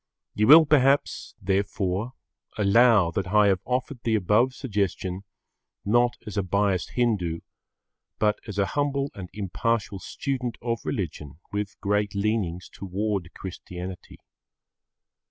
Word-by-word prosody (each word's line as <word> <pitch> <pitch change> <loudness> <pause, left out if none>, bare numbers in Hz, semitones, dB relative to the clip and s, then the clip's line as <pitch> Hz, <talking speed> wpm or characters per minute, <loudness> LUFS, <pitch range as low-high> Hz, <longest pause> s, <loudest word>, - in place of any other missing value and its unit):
You 105 +1 +1
will 160 +4 +10
perhaps, 140 -1 +2
therefore, 100 +2 -1 0.4
allow 105 -3 +5
that 95 +2 -2
I 105 +1 +4
have 95 -2 +2
offered 125 +1 -2
the 115 -2 +1
above 110 +6 +2
suggestion 95 -6 -2 0.6
not 120 +3 +3
as 105 -1 -7
a - - +3
biased 95 0 0
Hindu, 100 -9 0 0.8
but 105 -1 +1
as 105 -2 -6
a 100 - +3
humble 145 -1 0
and 95 -3 -8
impartial 105 +1 -2
student 125 +2 -4
of 115 -1 -2
religion 75 - -4
with 105 0 -4
great 105 0 0
leanings 100 -4 -1
towards 100 -2 -3
Christianity. 90 0 -8
105 Hz, 120 wpm, -26 LUFS, 95-120 Hz, 0.8 s, will